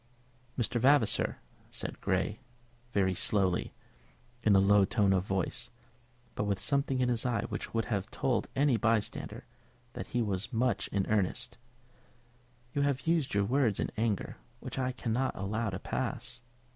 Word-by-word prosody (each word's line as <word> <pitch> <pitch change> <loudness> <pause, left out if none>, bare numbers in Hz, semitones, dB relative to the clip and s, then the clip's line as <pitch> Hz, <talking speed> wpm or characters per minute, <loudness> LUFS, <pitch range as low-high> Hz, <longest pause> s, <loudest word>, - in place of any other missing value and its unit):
"Mr. 120 -1 0
Vavasor," 135 -4 +3 0.3
said - - -6
Grey - - 0 0.5
very 95 -3 +2
slowly, 95 -1 +1 0.7
in 105 -3 +4
a - - +7
low 100 +1 +5
tone 100 -1 +3
of 95 -1 +2
voice, 95 +6 -1 0.6
but 105 - -2
with 100 -2 0
something 140 -2 +1
in 125 - +3
his 120 -2 +1
eye 115 -4 0
which - - -5
would 115 - +1
have 100 -1 -2
told 125 -2 0
any 135 -3 +3
bystander 110 -2 -1 0.5
that - - -6
he 120 -1 0
was 105 +3 -2
much 120 +1 +1
in 95 -1 0
earnest, 110 +4 0 1.1
"you 145 - +1
have 140 -2 0
used 165 -8 +1
words 110 +2 +2
in - - -1
your 110 - 0
anger 110 -4 -1 0.2
which - - -6
I 130 0 0
cannot 125 +1 -1
allow 105 +3 -1
to 95 - -3
pass. 120 +3 -4
115 Hz, 155 wpm, -31 LUFS, 100-125 Hz, 1.1 s, a